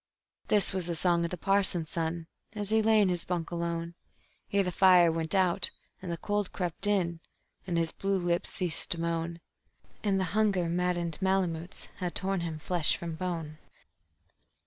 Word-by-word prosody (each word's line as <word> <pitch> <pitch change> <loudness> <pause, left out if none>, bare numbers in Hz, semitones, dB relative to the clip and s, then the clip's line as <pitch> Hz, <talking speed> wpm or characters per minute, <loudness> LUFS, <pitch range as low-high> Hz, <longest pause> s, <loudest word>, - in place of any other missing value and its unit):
_This 205 -2 +5
was 185 -2 -3
the 170 - -2
song 170 0 +2
of - - -2
the 180 - -5
parson's 190 -3 +2
son, 165 0 -2 0.3
as 205 -1 -3
he 220 0 +4
lay 220 0 +4
in 195 - +3
his 175 -1 -1
bunk 175 -2 -3
alone, 170 0 -3 0.6
Ere 200 0 +3
the 180 - -2
fire 180 -2 +6
went 160 +3 -2
out 185 -1 +3 0.3
and 180 -2 -5
the 170 - -3
cold 205 +1 -2
crept 180 +2 -4
in, 175 -5 +1 0.5
and 175 -2 -1
his 165 -1 0
blue 195 0 -1
lips 175 -1 -1
ceased 180 -3 -1
to 170 - -7
moan, 170 0 -2 0.6
And 195 -2 +1
the - - +1
hunger 200 -5 +2
maddened 175 -2 -1
malamutes 185 -2 -1
had 180 -2 -4
torn 195 0 0
him 165 -2 -4
flesh 170 0 +2
from 170 -1 -5
bone. 160 -3 -4
175 Hz, 175 wpm, -29 LUFS, 170-190 Hz, 0.6 s, fire